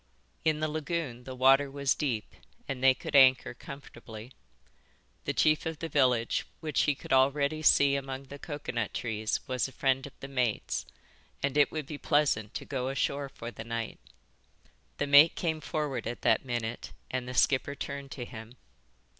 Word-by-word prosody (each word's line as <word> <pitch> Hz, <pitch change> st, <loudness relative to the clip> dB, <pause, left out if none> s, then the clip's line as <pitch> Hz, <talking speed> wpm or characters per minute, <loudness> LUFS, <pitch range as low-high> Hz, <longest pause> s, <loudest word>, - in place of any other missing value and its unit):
In 155 Hz, -1 st, +1 dB
the 155 Hz, -, +1 dB
lagoon 150 Hz, -5 st, -3 dB
the 130 Hz, -, -7 dB
water 135 Hz, +2 st, +5 dB
was 140 Hz, -1 st, +1 dB
deep 120 Hz, -8 st, -3 dB, 0.3 s
and 135 Hz, -3 st, -4 dB
they 130 Hz, -1 st, +6 dB
could 145 Hz, -, -5 dB
anchor 130 Hz, -2 st, +6 dB
comfortably. 120 Hz, -3 st, -10 dB, 0.9 s
The -, -, -1 dB
chief 155 Hz, 0 st, +2 dB
of 160 Hz, -1 st, -4 dB
the 165 Hz, +1 st, -5 dB
village 125 Hz, -6 st, +2 dB
which 155 Hz, -4 st, 0 dB
he 145 Hz, -, +2 dB
could -, -, -4 dB
already 140 Hz, +3 st, +3 dB
see 140 Hz, -2 st, +5 dB
among 135 Hz, -1 st, -4 dB
the 140 Hz, +1 st, -11 dB
coconut 135 Hz, -8 st, -4 dB
trees 110 Hz, -2 st, -2 dB
was 130 Hz, 0 st, -1 dB
a -, -, -12 dB
friend 135 Hz, 0 st, 0 dB
of 140 Hz, -, -16 dB
the 135 Hz, -, -7 dB
mate's, 125 Hz, -5 st, -1 dB, 0.6 s
and 140 Hz, 0 st, 0 dB
it 145 Hz, -1 st, +4 dB
would 155 Hz, -2 st, -4 dB
be 145 Hz, 0 st, -7 dB
pleasant 140 Hz, -9 st, +1 dB
to -, -, -4 dB
go 130 Hz, -2 st, -2 dB
ashore 140 Hz, +1 st, -1 dB
for 120 Hz, -2 st, -8 dB
the 110 Hz, -, -8 dB
night. 115 Hz, -1 st, -4 dB, 1.0 s
The -, -, 0 dB
mate 145 Hz, +3 st, +7 dB
came 160 Hz, -3 st, -1 dB
forward 140 Hz, -6 st, -3 dB
at 120 Hz, -, -5 dB
that -, -, +3 dB
minute 120 Hz, -2 st, -4 dB, 0.2 s
and 130 Hz, -1 st, -2 dB
the 125 Hz, -, -6 dB
skipper 140 Hz, +2 st, +2 dB
turned 140 Hz, 0 st, -6 dB
to 120 Hz, 0 st, -6 dB
him. 115 Hz, 0 st, -10 dB
135 Hz, 175 wpm, -30 LUFS, 125-145 Hz, 1.0 s, mate